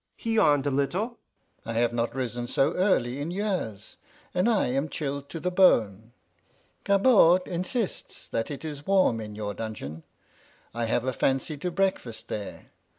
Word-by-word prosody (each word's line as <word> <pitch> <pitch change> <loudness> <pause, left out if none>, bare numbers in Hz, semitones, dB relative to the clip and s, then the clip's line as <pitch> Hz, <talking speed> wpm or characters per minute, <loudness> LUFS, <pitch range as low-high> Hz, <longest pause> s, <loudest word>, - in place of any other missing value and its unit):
He 225 - -2
yawned 150 -10 +4
a 145 - +1
little. 185 - -1 0.4
"I 115 - -5
have 120 +1 +1
not 120 +1 -1
risen 120 -2 -3
so 135 +5 +2
early 140 -9 +1
in 145 +3 -3
years, 185 - -3 0.4
and 180 +6 +2
I 220 -4 +3
am 135 +5 -1
chilled 140 -1 -4
to 165 - -5
the 180 +3 -1
bone. 115 - +3 0.7
Gabord 195 -4 +5
insists 185 +5 -3
that 115 - -2
it 145 +2 -6
is 145 -2 -7
warm 190 -13 +3
in 105 -1 -7
your 105 -1 -4
dungeon; 100 -9 -6 0.7
I 120 0 -1
have 115 +1 0
a 130 - 0
fancy 135 +4 0
to 180 +5 -3
breakfast 180 - -2
there. 105 -2 -6
140 Hz, 160 wpm, -27 LUFS, 115-185 Hz, 0.7 s, Gabord